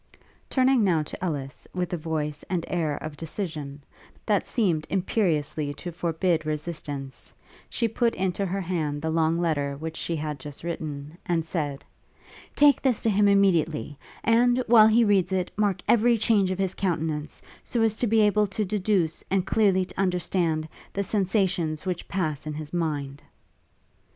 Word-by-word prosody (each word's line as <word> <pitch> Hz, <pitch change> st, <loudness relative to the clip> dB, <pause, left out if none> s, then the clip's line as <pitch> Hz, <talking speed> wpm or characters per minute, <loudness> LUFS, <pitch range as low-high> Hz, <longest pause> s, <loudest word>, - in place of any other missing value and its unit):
Turning 260 Hz, -3 st, +3 dB
now 170 Hz, -6 st, +2 dB
to 150 Hz, -, -8 dB
Ellis, 145 Hz, -6 st, -4 dB
with 180 Hz, -1 st, -2 dB
a -, -, +2 dB
voice 155 Hz, -2 st, -3 dB
and 175 Hz, -3 st, -1 dB
air 155 Hz, -5 st, -1 dB
of 155 Hz, -1 st, -6 dB
decision, 155 Hz, -4 st, -5 dB, 0.4 s
that 205 Hz, -3 st, +1 dB
seemed 175 Hz, -10 st, 0 dB
imperiously 160 Hz, -7 st, 0 dB
to 175 Hz, -, -6 dB
forbid 170 Hz, 0 st, 0 dB
resistance, 150 Hz, -3 st, -5 dB, 0.4 s
she 230 Hz, -, 0 dB
put 230 Hz, +1 st, 0 dB
into 185 Hz, +1 st, -1 dB
her 195 Hz, +2 st, -2 dB
hand 160 Hz, -5 st, -2 dB
the 160 Hz, -, 0 dB
long 160 Hz, 0 st, +2 dB
letter 145 Hz, -5 st, 0 dB
which 160 Hz, +2 st, -5 dB
she 170 Hz, -, -2 dB
had 150 Hz, -2 st, -4 dB
just 145 Hz, +2 st, -9 dB
written, 155 Hz, -1 st, -5 dB
and 165 Hz, -2 st, 0 dB
said, 145 Hz, -5 st, -3 dB, 0.7 s
'Take 290 Hz, -1 st, +5 dB
this 255 Hz, -5 st, +2 dB
to 225 Hz, -, +2 dB
him 205 Hz, +1 st, +4 dB
immediately; 170 Hz, -7 st, +2 dB, 0.3 s
and, 240 Hz, +2 st, +4 dB
while 220 Hz, -2 st, +7 dB
he 225 Hz, +2 st, +5 dB
reads 200 Hz, -3 st, +3 dB
it, 185 Hz, -1 st, -1 dB
mark 205 Hz, -3 st, +1 dB
every 235 Hz, +1 st, +4 dB
change 210 Hz, -3 st, +3 dB
of 185 Hz, -, -2 dB
his 190 Hz, -1 st, -1 dB
countenance, 160 Hz, -5 st, -2 dB, 0.2 s
so 235 Hz, -2 st, 0 dB
as 220 Hz, -1 st, +2 dB
to 240 Hz, -, +1 dB
be 220 Hz, +1 st, +4 dB
able 210 Hz, 0 st, +3 dB
to 205 Hz, +2 st, -2 dB
deduce, 190 Hz, -4 st, 0 dB
and 190 Hz, -1 st, +1 dB
clearly 195 Hz, -4 st, +3 dB
to -, -, -11 dB
understand, 175 Hz, -4 st, 0 dB, 0.3 s
the 200 Hz, -, -1 dB
sensations 185 Hz, -5 st, 0 dB
which 180 Hz, -2 st, -3 dB
pass 155 Hz, -6 st, -2 dB
in 150 Hz, -, -4 dB
his 155 Hz, 0 st, -7 dB
mind.' 145 Hz, -5 st, -2 dB
175 Hz, 165 wpm, -26 LUFS, 155-200 Hz, 0.7 s, while